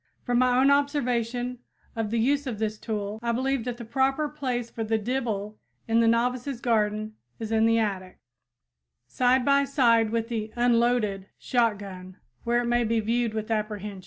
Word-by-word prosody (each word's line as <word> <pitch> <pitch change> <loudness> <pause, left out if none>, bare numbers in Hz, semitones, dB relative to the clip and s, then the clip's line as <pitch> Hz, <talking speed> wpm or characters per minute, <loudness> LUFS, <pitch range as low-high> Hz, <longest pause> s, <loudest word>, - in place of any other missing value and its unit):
From 245 -1 +1
my 250 -1 +3
own 270 +2 +5
observation 250 -4 0 0.4
of 225 -2 -2
the 230 - -1
use 280 +5 +1
of 235 -4 -3
this 215 0 -2
tool, 210 -1 -4
I 235 0 0
believe 260 0 -1
that 245 -1 -4
the 235 - -8
proper 270 +5 +1
place 255 -5 -3
for 230 -1 -5
the 220 0 0
dibble 215 -3 -3 0.3
in 225 0 +3
the 230 - +4
novices 245 +2 0
garden 215 -2 0 0.2
is 220 -1 -6
in 225 0 +3
the 230 0 +3
attic, 195 -4 -2 0.9
side 250 - +2
by 280 0 +4
side 235 -5 +3
with 225 0 -1
the 220 -2 -4
"unloaded" 235 -5 +1
shotgun, 200 -6 -2 0.3
where 240 +1 +1
it - - -3
may 240 0 +2
be 230 0 +1
viewed 230 +1 0
with 220 +1 -3
apprehension. 210 -2 -3
230 Hz, 175 wpm, -26 LUFS, 215-250 Hz, 0.9 s, own